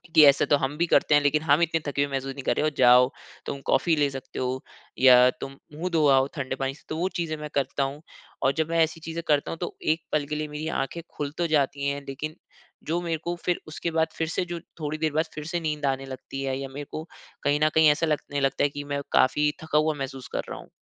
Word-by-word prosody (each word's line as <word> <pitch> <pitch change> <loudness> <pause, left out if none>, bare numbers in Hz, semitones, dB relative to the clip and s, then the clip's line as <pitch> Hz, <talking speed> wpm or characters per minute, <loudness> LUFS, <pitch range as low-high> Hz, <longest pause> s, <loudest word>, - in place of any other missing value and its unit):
कि, 155 - +9
"ऐसा 140 0 +6
तो 145 - +4
हम 140 +2 -2
भी 170 - +2
करते 150 - +4
हैं, 145 - +5
लेकिन 145 +1 +2
हम 150 +2 +4
इतने 165 -1 +2
थके 140 0 +1
हुए 140 - -3
महसूस 135 0 -2
नहीं 140 -1 -8
कर - - +1
रहें। 150 - +2
ओ - - +3
जाओ 125 0 +7 0.4
तुम 140 - -4
कॉफ़ी 160 +5 +3
ले 145 -2 +2
सकते 135 -1 -7
हो 130 0 -2 0.4
या 125 -1 +8
तुम 135 0 -6 0.2
मुँह 170 +5 -3
धो 155 -2 +4
आओ 135 -1 +5
ठंडे 135 -3 -3
पानी 135 0 -2
से।" - - -20
तो 155 - -3
वो 180 +3 0
चीज़ें 165 -2 -1
मैं 150 0 -6
करता 140 0 0
हूँ, 140 +2 -4 0.4
और 135 - +4
जब 160 0 0
मैं 165 0 +1
ऐसी 160 +1 -3
चीज़ें 165 +1 -5
करता 145 -2 +2
हूँ - - -5
तो 175 - -4
एक 160 +1 +1
पल 150 -1 +1
के 150 - -3
लिए 155 0 -2
मेरी 150 +1 -5 0.2
आँखें 170 +5 -6 0.2
खुल 145 -1 -2
तो 175 - +1
जाती 140 -2 +1
है, 140 0 -2
लेकिन 150 +3 -5 0.5
जो 170 +2 0
मेरे 165 -2 -1
को 175 0 -2
फिर 180 - +1
उसके 155 +2 -4
बाद 160 0 +2
फिर 160 - 0
से 170 - -1
जो 175 -1 -5 0.2
थोड़ी 155 0 -3
देर 155 -1 0
बाद 160 +2 +2
फिर 150 - -6
से 175 +2 -2
नींद 150 -2 -2
आने 135 0 0
लगती 135 +1 -7
है, 135 -1 -1
या 135 - -4
मेरे 145 +2 -7
को 155 - -4 0.4
कहीं 145 +1 +2
न 155 - +5
कहीं 160 -1 +7
ऐसा 160 +3 +1
लगने 145 -2 -1
लगता 135 0 +1
है 145 - +3
की 145 +1 -6
मैं 140 - -1
काफ़ी 150 +3 +3
थका 155 -1 0
हुआ 155 0 +3
महसूस 135 -2 -6
कर - - 0
रहा - - -6
हूँ। - - -14
150 Hz, 270 wpm, -26 LUFS, 135-160 Hz, 0.5 s, कि